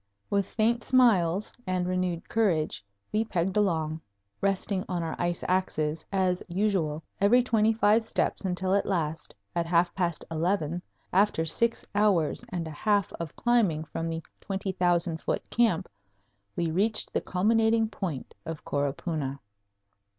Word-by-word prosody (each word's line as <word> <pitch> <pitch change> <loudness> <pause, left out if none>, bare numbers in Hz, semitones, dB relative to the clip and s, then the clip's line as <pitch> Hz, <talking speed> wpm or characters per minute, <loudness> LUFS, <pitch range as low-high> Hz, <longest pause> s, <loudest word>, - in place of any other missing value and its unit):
With 200 -1 +1
faint 235 +2 +1
smiles 210 -7 +3
and 180 -1 0
renewed 180 -2 -1
courage 180 - +1 0.3
we 215 +1 +2
pegged 185 -3 -1
along, 160 -6 +1 0.4
resting 195 0 0
on 175 -2 -1
our 160 - -3
ice 175 -1 -1
axes, 160 -4 0
as 185 -2 +1
usual, 175 -5 0 0.2
every 240 +5 +5
twenty 225 -3 +3
five 220 0 +3
steps 220 - -1
until 185 0 0
at 200 - +2
last, 160 -4 -2 0.2
at 170 -1 0
half 175 0 +3
past 175 -4 -1
eleven, 170 0 0 0.3
after 190 -4 +3
six 230 +9 0
hours 200 -4 +2
and 175 -5 -3
a - - -6
half 205 +4 +1
of 165 -3 -5
climbing 215 -11 +2
from 165 +1 -4
the 165 0 -4 0.2
20,000 180 -4 0
foot - - -2
camp, 230 -8 +2 0.7
we 170 -2 0
reached 210 +6 +1
the - - +1
culminating 225 +4 +2
point 185 - -5
of 160 -2 -7
Coropuna. 140 0 -2
185 Hz, 140 wpm, -28 LUFS, 165-205 Hz, 0.7 s, every